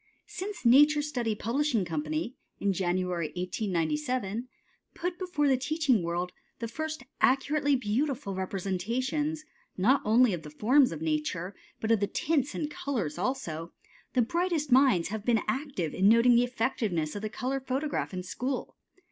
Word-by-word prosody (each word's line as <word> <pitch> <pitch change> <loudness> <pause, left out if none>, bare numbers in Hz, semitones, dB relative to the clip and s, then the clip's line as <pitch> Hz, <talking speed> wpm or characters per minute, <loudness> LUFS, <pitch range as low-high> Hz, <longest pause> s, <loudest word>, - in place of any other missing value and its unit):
Since 375 -4 -6
Nature 295 +5 +6
Study 245 -7 -1
Publishing 235 -1 0
Company, 155 - -3 0.2
in 200 -1 +1
January, 180 -2 -1
1897, 210 - -1 0.5
put 350 +1 -3
before 355 -6 0
the 265 -2 +4
teaching 270 - +1
world 175 +1 -2 0.3
the 230 - -4
first 310 +3 -4 0.2
accurately 285 +2 +3
beautiful 250 -1 -1
representations, 230 - -2 0.3
not 250 +9 +4
only 225 +1 +4
of 170 - -3
the 150 - -9
forms 250 - +4
of 160 -1 -5
nature 160 +4 -1 0.3
but 220 - -1
of 225 - +4
the 205 - +1
tints 295 +1 0
and 300 -1 -3
colors 205 - -3
also, 175 - -3 0.4
the 250 - +4
brightest 335 +1 -1
minds 250 -11 +5
have 215 0 -4
been 230 -2 +2
active 265 - -2
in 195 +2 +4
noting 230 +2 +6
the 240 +1 +5
effectiveness 225 -10 -1
of 205 - -4
the 215 - -3
color 260 +4 -2
photograph 270 +3 -2
in 185 -1 -4
school. 250 +8 -4
235 Hz, 150 wpm, -29 LUFS, 185-280 Hz, 0.5 s, Nature